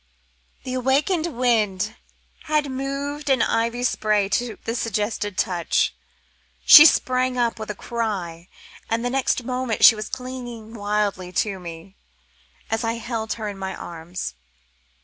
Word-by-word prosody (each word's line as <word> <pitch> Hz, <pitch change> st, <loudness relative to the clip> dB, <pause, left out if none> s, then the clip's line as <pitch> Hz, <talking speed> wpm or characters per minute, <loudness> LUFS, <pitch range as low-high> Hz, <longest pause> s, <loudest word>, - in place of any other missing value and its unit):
Ah!" -, -, -40 dB
The 255 Hz, -, -5 dB
awakened 285 Hz, +7 st, +1 dB
wind 220 Hz, -, 0 dB, 0.5 s
had 300 Hz, -2 st, 0 dB
moved 280 Hz, +2 st, -4 dB
an 265 Hz, -3 st, +4 dB
ivy 235 Hz, +2 st, 0 dB
spray 215 Hz, -4 st, +1 dB
to 225 Hz, +2 st, -1 dB
the 225 Hz, -, -2 dB
suggested 210 Hz, -3 st, -2 dB
touch. 175 Hz, -2 st, +1 dB, 0.7 s
She 305 Hz, +1 st, +11 dB
sprang 255 Hz, -2 st, +1 dB
up 235 Hz, -2 st, 0 dB
with 220 Hz, -, -6 dB
a 210 Hz, -, -3 dB
cry, 190 Hz, -8 st, -4 dB, 0.4 s
and 230 Hz, +1 st, -1 dB
the 245 Hz, -, -1 dB
next 260 Hz, -1 st, 0 dB
moment 250 Hz, -2 st, +1 dB
she -, -, +10 dB
was 215 Hz, -1 st, -6 dB
clinging 245 Hz, -3 st, -7 dB
wildly 205 Hz, -4 st, -2 dB
to 200 Hz, -3 st, -5 dB
me, 170 Hz, +2 st, -10 dB, 0.7 s
as 225 Hz, +1 st, 0 dB
I 225 Hz, 0 st, 0 dB
held 230 Hz, -1 st, -3 dB
her 220 Hz, -2 st, -5 dB
in 200 Hz, -1 st, -6 dB
my 190 Hz, 0 st, -4 dB
arms. 170 Hz, +2 st, -6 dB
225 Hz, 145 wpm, -23 LUFS, 195-255 Hz, 0.7 s, She